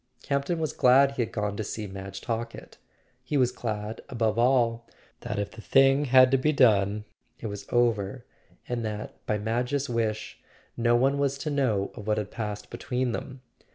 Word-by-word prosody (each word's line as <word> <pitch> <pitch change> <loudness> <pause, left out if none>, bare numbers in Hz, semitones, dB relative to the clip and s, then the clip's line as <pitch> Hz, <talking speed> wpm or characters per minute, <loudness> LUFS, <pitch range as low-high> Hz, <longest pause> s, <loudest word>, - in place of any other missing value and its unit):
Campton 140 +5 -1
was 155 -2 -2
glad 135 +2 +5
he 140 - -2
had 115 - -2
gone 105 -1 -2
to 110 - -2
see 105 +1 -5
Madge 95 -1 -7
Talkett. 115 0 -5 0.4
He 145 +3 -1
was 125 -2 +3
glad, 110 -2 -4
above 115 -3 0
all, 120 -2 +2 0.3
that - - -5
if 100 0 -2
the 110 - -11
thing 135 +4 +4
had 130 -1 +6
to 135 - +4
be 150 +4 +2
done 105 -6 +3 0.3
it - - -8
was 100 -2 -6
over, 120 -1 +1 0.4
and 120 -1 -2
that, 105 -1 -6
by 105 - +1
Madge's 125 +6 -1
wish, 110 -2 -2 0.4
no 120 0 +3
one 135 +3 +2
was 140 -1 +1
to 150 +2 -3
know 115 -9 0
of 105 -2 -10
what 105 0 +1
had 105 -1 -3
passed 105 -2 -5
between 125 0 -2
them. 130 +2 -6
115 Hz, 185 wpm, -27 LUFS, 105-130 Hz, 0.4 s, had